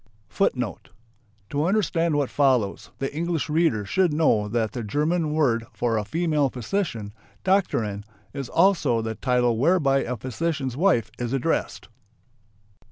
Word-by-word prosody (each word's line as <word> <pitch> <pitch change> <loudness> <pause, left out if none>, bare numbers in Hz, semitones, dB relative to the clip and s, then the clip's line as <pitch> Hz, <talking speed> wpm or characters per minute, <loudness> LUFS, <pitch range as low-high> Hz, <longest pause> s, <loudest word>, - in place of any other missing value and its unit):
To 145 +1 0
understand 170 -5 +1
what 145 -3 0
follows, 130 -8 +1
the 135 - -3
English 165 0 -2
reader 150 -10 +1
should 180 - +2
know 150 -9 +2
that 110 0 -1
the 120 - -5
German 150 - 0
word 120 -7 +1
for 120 -2 0
a 105 - 0
female 155 +2 0
physician 125 - -3 0.3
("Doktorin") 115 - +1 0.3
is 135 -3 -5
also 165 - +3
the 110 0 -3
title 120 -1 +1
whereby 140 -2 +3
a 125 -2 -3
physician's 135 +1 -3
wife 165 - +2
is 120 +1 -2
addressed. 135 - -1
135 Hz, 130 wpm, -24 LUFS, 115-165 Hz, 0.3 s, also